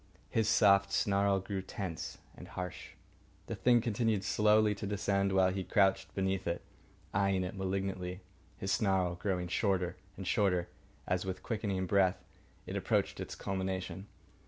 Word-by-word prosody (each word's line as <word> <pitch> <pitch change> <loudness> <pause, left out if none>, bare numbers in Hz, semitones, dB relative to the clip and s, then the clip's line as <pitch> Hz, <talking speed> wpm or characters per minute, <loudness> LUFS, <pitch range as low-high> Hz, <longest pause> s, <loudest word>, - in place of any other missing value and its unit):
His 110 -1 +2
soft 100 -3 +5
snarl 100 0 +2
grew 95 0 -4
tense 95 -3 -5 0.2
and - - -10
harsh. 90 -1 -6 0.5
The - - -4
hand 120 -2 +5
continued 110 -3 +1
slowly 105 0 +4
to 105 0 -5
descend, 100 -1 +1
while 95 -1 +4
he 95 0 -2
crouched 95 -1 +2
beneath 95 -1 -1
it, 85 0 -2 0.5
eyeing 100 -1 +2
it 90 +2 -4
malignantly, 95 -1 -3 0.4
his 95 - -2
snarl 95 -4 +2
growing 90 0 -2
shorter 90 -1 0 0.2
and 95 - -6
shorter 90 -4 +1 0.4
as, 90 0 0
with 95 -1 -5
quickening 100 -5 -1
breath, 95 0 +3 0.5
it - - -5
approached - - 0
its - - -5
culmination. 95 0 -3
95 Hz, 145 wpm, -33 LUFS, 95-100 Hz, 0.5 s, soft